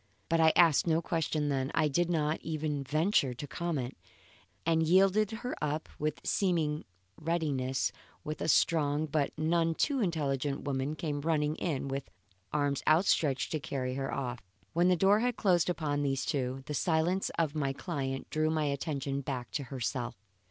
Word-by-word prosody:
But 165 -1 +2
I 160 0 +6
asked 165 -1 +5
no 165 0 +3
questions 155 -3 -1
then; 135 0 -1
I 155 - +3
did 170 +4 +1
not 155 -2 +1
even 155 -3 -2
venture 150 -2 +2
a - - -4
comment; 145 -6 -3 0.7
and 165 0 +3
yielded 190 +5 +4
her 235 +3 -4
up 150 +1 -2
with 150 0 -2
seeming 160 -6 0 0.3
readiness 150 -6 0 0.3
when 155 0 -4
a - - -2
strong 150 -2 +3
but 150 -2 0
none 165 +1 +1
too 280 - +1
intelligent 145 - -1
woman 140 +1 -2
came 150 -2 -3
running 155 -1 +1
in 150 -6 -2
with 135 0 -4 0.4
arms 145 -2 0
outstretched 155 -4 +3
to 155 - 0
carry 130 -2 -3
her 135 +1 -3
off. 125 -3 -3 0.3
When 170 +2 +3
the 185 - +5
door 195 +4 +5
had 245 0 0
closed 180 -4 +3
upon 150 -4 -1
these 135 -2 0
two, 130 -1 -2
the 150 - -4
silence 170 +5 +1
of 160 -3 +1
my 140 -3 0
client 135 -3 -4
drew 155 0 +1
my 155 -1 +1
attention 140 -1 -2
back 125 -3 -4
to 140 - -3
herself. 125 -1 -3
150 Hz, 165 wpm, -31 LUFS, 140-165 Hz, 0.7 s, I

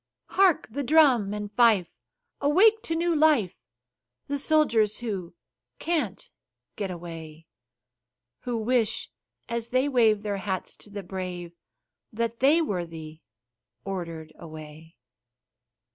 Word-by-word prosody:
Hark! 380 -4 +3
the 280 +5 -3
drum 265 -8 +4
and 210 0 -5
fife 215 -6 +4 0.5
awake 410 +10 +5
to 330 - -3
new 340 0 +1
life 295 - +3 0.7
The 285 0 -2
soldiers 235 -9 +3
who 195 -8 -5 0.4
"Can't 290 - -2 0.5
get 200 -2 -3
away;" 165 -2 -8 0.9
Who 245 -2 -3
wish, 225 -1 0 0.4
as 235 -1 -2
they 255 +2 +2
wave 225 -6 +3
their 205 -1 -2
hats 190 -2 -3
to - - -13
the 200 -1 -6
brave, 180 -2 -6 0.6
That 230 +1 -2
they 300 +6 +4
were 180 - -2
the 160 -1 -10 0.6
Ordered 165 -5 -5
away. 155 0 -11
215 Hz, 115 wpm, -26 LUFS, 175-275 Hz, 0.9 s, awake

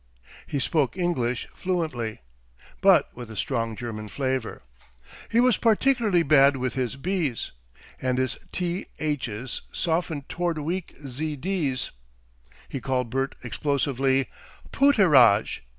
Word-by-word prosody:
He - - -2
spoke 140 +3 0
English 130 -10 0
fluently, 155 - -2 0.6
but - - +5
with 120 -2 -8
a 110 - -8
strong 115 -1 -1
German 110 -2 -6
flavour. 130 - -3 0.7
He 230 - +3
was 250 -1 +4
particularly 225 -5 +3
bad 140 -2 +5
with 130 -2 -2
his 130 -2 -2
"b's," 155 -4 -2 0.5
and 130 -1 0
his 130 -1 0 0.2
"th's" 150 - -3
softened 160 -4 -1
towards 175 -3 -1
weak 170 +4 -3
"z'ds." 150 +1 -2 0.8
He 135 - -5
called 125 -3 -1
Bert 135 +1 -1
explosively, 135 0 0 0.4
"Pooterage." 150 - +5
140 Hz, 110 wpm, -26 LUFS, 125-175 Hz, 0.8 s, but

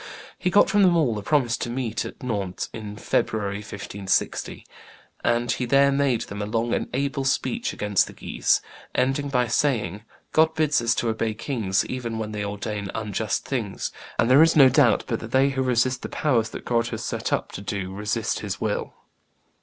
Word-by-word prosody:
He 180 - +1
got 205 - +5
from 205 - +3
them 180 -3 +5
all 130 -9 +2
a - - -6
promise 120 0 +2
to - - -4
meet 120 -2 -2
him - - -4
at - - -17
Nantes 100 -7 -3
in 105 -2 -7
February, 100 -1 -1
1560, 100 -1 -3 0.6
and 120 0 +1
he 125 - -1
there 140 +3 +4
made 135 -4 +1
them 100 -1 -6
a 105 - -2
long 115 +2 0
and - - -1
able 135 +1 -1
speech 230 - 0
against 105 -2 +1
the - - -10
Guises, - - 0 0.3
ending 135 +3 +1
by 125 -3 +2
saying, 110 -6 0 0.3
'God 160 0 +3
bids 155 -4 +2
us 115 0 +2
to 115 - 0
obey 110 0 -1
kings 110 -6 -1
even 120 -3 -4
when 110 -1 -4
they 105 -1 -3
ordain 100 0 -4
unjust 105 -1 -2
things, 115 -8 -3 0.3
and 115 - +3
there 130 +4 +7
is 165 0 +5
no 135 -4 +8
doubt - - +4
but - - -2
that - - -8
they 135 +1 +4
who 135 -1 -1
resist 125 0 +1
the - - -5
powers 120 -7 +1
that - - -8
God 115 -1 +1
has 110 -2 -5
set - - -3
up - - -1
do 100 -1 -4
resist 105 +1 -1
His - - -4
will. - - -2
120 Hz, 195 wpm, -24 LUFS, 105-135 Hz, 0.6 s, no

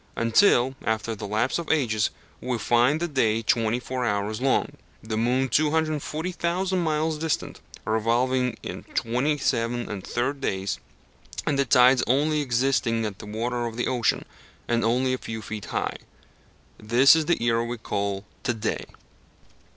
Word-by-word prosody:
Until, 120 - +4
after 110 +1 -1
the 105 - -6
lapse 110 +9 0
of 170 - -6
ages, 110 -9 +1 0.3
we 125 -2 -2
find 120 +6 +3
the 175 - -1
day 115 -7 +1
twenty 115 +1 +1
four 130 0 -4
hours 105 0 -1
long, 135 0 +1 0.3
the 110 0 -3
moon 125 +4 +1
240,000 160 +5 0
miles 155 -1 0
distant, 160 -1 -2 0.2
revolving 120 +3 +1
in - - -6
27 120 -2 0
1/3 120 +7 -3
days, 95 -5 -2 0.7
and 140 -2 0
the 140 - +3
tides 125 +1 +5
only 150 +4 +2
existing 120 -3 +1
in 105 - -3
the - - -8
water 120 +3 -2
of 115 0 -7
the 120 - 0
ocean, 125 -3 0 0.4
and 120 0 +1
only 125 +3 +2
a 130 - -2
few 110 0 -6
feet 105 -2 -6
high. - - -2 0.8
This 120 +7 +6
is 160 -2 0
the 175 - +3
era 115 -1 +2
we 120 +1 -4
call 100 -2 -3 0.2
"to 120 - -1
day." 110 0 -3
120 Hz, 150 wpm, -25 LUFS, 110-140 Hz, 0.8 s, This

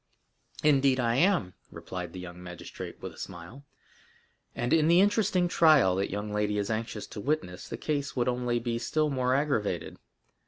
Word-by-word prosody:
"Indeed 135 -3 +4
I 120 0 +1
am," 170 - +2 0.2
replied 90 -2 -7
the 95 - -8
young 90 0 -9
magistrate 90 -1 -8
with - - -6
a - - -15
smile; 90 +10 -9 0.9
"and 120 0 0
in 160 -1 +4
the 170 +2 +6
interesting 200 -2 +3
trial 155 - +5
that 100 - 0
young 105 +1 -4
lady 105 0 0
is 100 +1 -1
anxious 110 -1 -3
to 105 - -8
witness, 135 -10 -2
the - - -5
case 145 -2 -2
would 125 -1 0
only 125 -1 0
be 115 0 -2
still 150 +5 0
more 130 -1 +1
aggravated. 110 - -1
120 Hz, 170 wpm, -28 LUFS, 100-150 Hz, 0.9 s, the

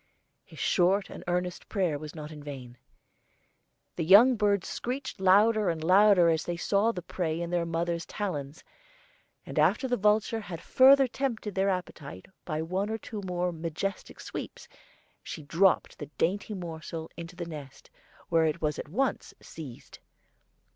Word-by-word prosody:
His - - -16
short 190 +2 +2
and - - -9
earnest 180 0 -2
prayer 180 -8 0
was 155 +1 -9
not 150 -1 -7
in 150 -1 -10
vain. 130 -4 -9 1.2
The - - 0
young 215 +10 +7
birds 205 -3 +1
screeched 260 -2 -4
louder 205 +3 +4
and 160 -2 -2
louder 190 0 +6
as 160 -1 +1
they 175 -1 -4
saw 200 +6 +2
the 180 -6 -7
prey 165 -3 -2
in 170 0 -4
their 175 -1 0
mother's 170 0 -2
talons; 150 -8 -5 0.8
and - - -3
after 265 - +3
the 245 -1 0
vulture 210 +2 +2
had 180 -6 -7
further 265 +8 +6
tempted 235 -5 -3
their 195 +1 +1
appetite 155 - -5 0.2
by 155 -1 -2
one 190 +5 -2
or 220 - -2
two 215 -1 -7
more 180 0 -1
majestic 170 +4 -5
sweeps, - - -7 0.5
she 155 - -8
dropped 175 +6 +2
the 145 - -6
dainty 205 +4 -1
morsel 165 -2 -7
into 170 +1 -9
the 175 -1 -5
nest, 145 -5 -10 0.4
where 165 -1 +3
it 155 - -2
was 150 -2 -1
at - - -7
once 260 - -1
seized. 140 -7 -11
180 Hz, 160 wpm, -28 LUFS, 160-205 Hz, 1.2 s, young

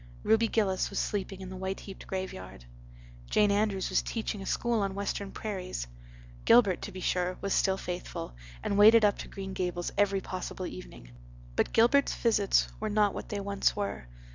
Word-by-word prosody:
Ruby 225 +1 +4
Gillis 200 -4 +1
was - - -6
sleeping 195 -1 -2
in 190 - -7
the 190 - -7
white 190 +1 -4
heaped 195 - -10
graveyard; 95 - -6 0.6
Jane 210 -1 +4
Andrews 200 -2 0
was - - +3
teaching 220 -3 -4
a 195 - -7
school 235 -2 +1
on 195 -1 -1
western 200 0 -3
prairies. 185 - -4 0.6
Gilbert, 210 -7 +5
to 205 - -6
be 185 0 -8
sure, 180 0 0
was 200 -1 -1
still 190 -1 +2
faithful, 175 - -5 0.3
and 200 - 0
waded 220 +1 +8
up 205 - +2
to - - -6
Green 195 -1 -7
Gables 175 -2 -2
every 200 -1 +3
possible 185 0 -5
evening. - - -9 0.4
But - - +1
Gilbert's 240 +5 +4
visits 210 -4 +2
were 215 - -2
not 210 -1 +2
what - - -7
they 205 - -3
once 200 0 +1
were. 200 - -4
195 Hz, 180 wpm, -29 LUFS, 185-210 Hz, 0.6 s, waded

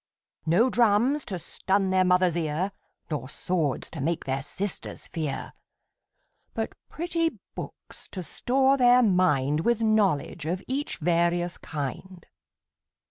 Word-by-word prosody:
No 225 +11 +4
drums 240 +5 +3
to 190 - -3
stun 190 +3 0
their 185 0 +4
Mother's 180 -1 +3
ear, 165 +3 -1 0.4
Nor 135 -4 -3
swords 155 -5 -1
to 160 - -6
make 165 +4 -1
their 135 0 -1
sisters 195 +7 -5
fear; 155 -5 -4 1.0
But - - -2 0.2
pretty 335 0 -1 0.2
books - - -9
to 185 - -6
store 265 - +2
their 250 -1 +6
mind 150 - +3
With 230 +6 +1
knowledge 195 -8 +1
of 180 +3 -2
each 275 +3 -2
various 175 +1 +1
kind. 160 +5 -6
180 Hz, 125 wpm, -27 LUFS, 160-225 Hz, 1.0 s, their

